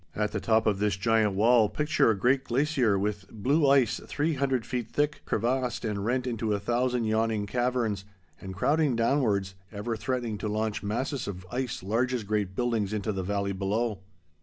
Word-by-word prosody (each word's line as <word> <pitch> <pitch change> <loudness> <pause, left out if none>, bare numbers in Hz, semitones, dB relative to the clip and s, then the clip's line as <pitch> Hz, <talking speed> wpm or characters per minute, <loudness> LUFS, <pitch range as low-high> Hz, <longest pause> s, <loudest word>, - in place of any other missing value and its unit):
At 105 0 0
the 105 - -2
top 110 +1 +2
of 105 -3 +1
this 105 -3 +1
giant 110 -1 +2
wall, 110 +1 +4
picture 150 -2 +2
a 110 - +2
great 130 +6 +2
glacier 130 -5 +1
with 100 0 -3
blue 140 +7 +2
ice 135 -4 +3
three 155 +3 0
hundred 135 -4 0
feet 120 -3 -3
thick, 150 +1 0
crevassed 125 +2 -1
and 105 -2 -2
rent 125 +4 0
into 115 -3 -1
a - - -2
thousand 120 +3 0
yawning 110 -1 0
caverns, 120 -3 -1 0.4
and 95 0 -7
crowding 145 - +2
downwards, 115 -6 +1 0.2
ever 110 +2 -3
threatening 120 -2 -3
to - - -3
launch 110 0 -1
masses 125 +6 -2
of 95 -2 -6
ice 125 -5 -3
large 120 +6 0
as 120 - -3
great 100 -2 -2
buildings 115 -4 0
into 105 0 -1
the 95 -2 -3
valley 100 +1 -1
below. 100 +2 -1
115 Hz, 185 wpm, -28 LUFS, 105-125 Hz, 0.4 s, wall